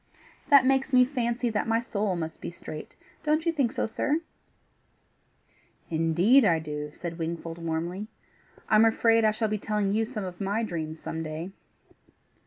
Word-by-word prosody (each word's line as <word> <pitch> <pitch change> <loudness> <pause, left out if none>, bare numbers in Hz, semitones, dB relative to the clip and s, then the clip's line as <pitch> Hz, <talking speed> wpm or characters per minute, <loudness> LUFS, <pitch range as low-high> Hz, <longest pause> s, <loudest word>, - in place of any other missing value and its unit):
That 280 -3 +7
makes 270 +1 +2
me 250 0 +7
fancy 245 -2 -1
my 225 +1 +1
soul 210 -4 -1
must 160 -2 -5
be - - -4
straight. 155 -2 -9 0.3
Don't 310 +1 +1
you 335 - +3
think 275 -8 +1
so, - - -1
sir?" 290 +8 -1 1.7
"Indeed 170 +11 +4
I 170 -6 +4
do," 150 -1 -5
said 170 +2 -7
Wingfold 165 0 -4
warmly. 170 +5 -3 0.6
"I'm 215 0 +5
afraid 225 0 +4
I 215 - +5
shall 215 +1 -1
be 215 0 -2
telling 210 -1 0
you 225 +1 +2
some 220 -3 -5
of 180 -1 -7
my 205 +4 0
dreams 160 -5 -4
some 160 - -5
day." 160 +3 -5
210 Hz, 160 wpm, -27 LUFS, 165-235 Hz, 1.7 s, That